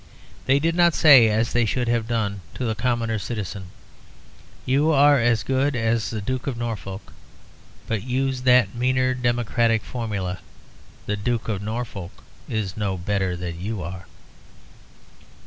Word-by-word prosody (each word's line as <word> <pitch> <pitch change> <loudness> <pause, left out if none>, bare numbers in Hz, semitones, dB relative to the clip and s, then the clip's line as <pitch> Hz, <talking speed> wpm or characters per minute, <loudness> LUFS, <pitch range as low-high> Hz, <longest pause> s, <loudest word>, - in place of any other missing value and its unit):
They 135 - +5
did 165 +3 +1
not 170 -1 +4
say, 135 -8 +7
as 110 +2 0
they 120 0 +3
should 120 +2 -1
have 115 -1 0
done, 105 -4 -2
to 130 - -3
the 110 - 0
common 115 -1 -1
citizen, 100 -2 -5 1.0
'You 140 +5 +2
are 145 -1 +5
as 115 -2 +2
good 135 +1 0
as 115 -1 0
the 110 -2 -4
Duke 130 +6 -3
of 130 -4 -2
Norfolk,' 110 -4 -6 0.7
but 110 -3 -2
used 130 +2 -2
that 125 -5 +5
meaner 130 +1 +1
democratic 120 -2 +1
formula, 100 -7 -4 0.7
'The 105 - -2
Duke 115 +2 -2
of 100 -3 -2
Norfolk 105 -4 -6 0.3
is 105 -5 -2
no 100 -3 -2
better 95 0 -1
than 85 -1 -6
you 105 -1 -4
are.' 90 +3 -8
115 Hz, 145 wpm, -23 LUFS, 100-125 Hz, 1.0 s, say